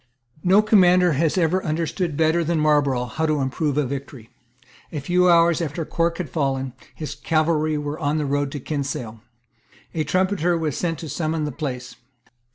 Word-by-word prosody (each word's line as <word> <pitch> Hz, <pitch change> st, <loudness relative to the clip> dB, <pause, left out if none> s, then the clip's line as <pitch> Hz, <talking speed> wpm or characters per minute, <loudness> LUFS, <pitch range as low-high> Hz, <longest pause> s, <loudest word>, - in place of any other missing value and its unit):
No 195 Hz, +4 st, +5 dB
commander 180 Hz, -4 st, +5 dB
has 160 Hz, +4 st, +1 dB
ever 180 Hz, +2 st, +2 dB
understood 165 Hz, 0 st, -2 dB
better 160 Hz, +1 st, +2 dB
than 165 Hz, 0 st, 0 dB
Marlborough 145 Hz, -5 st, +2 dB
how 160 Hz, +7 st, -2 dB
to 155 Hz, -1 st, +1 dB
improve 140 Hz, +2 st, -1 dB
a 150 Hz, -, +2 dB
victory. 135 Hz, -3 st, -7 dB, 0.6 s
A 155 Hz, -, -3 dB
few 180 Hz, +5 st, +2 dB
hours 170 Hz, -1 st, +4 dB
after 160 Hz, 0 st, -3 dB
Cork 170 Hz, +1 st, 0 dB
had 180 Hz, -, -3 dB
fallen, 135 Hz, -3 st, -2 dB, 0.2 s
his 155 Hz, -, -5 dB
cavalry 155 Hz, -1 st, +1 dB
were 150 Hz, +1 st, -4 dB
on 150 Hz, -1 st, 0 dB
the 150 Hz, -, -1 dB
road 140 Hz, 0 st, -1 dB
to 145 Hz, -, -4 dB
Kinsale. 135 Hz, -6 st, -4 dB, 0.7 s
A 160 Hz, -, 0 dB
trumpeter 185 Hz, -1 st, +1 dB
was 155 Hz, -4 st, -2 dB
sent 165 Hz, -2 st, -2 dB
to 160 Hz, -, -7 dB
summon 155 Hz, +1 st, -2 dB
the 150 Hz, -, -3 dB
place. 125 Hz, -3 st, -5 dB
155 Hz, 170 wpm, -22 LUFS, 140-170 Hz, 0.7 s, No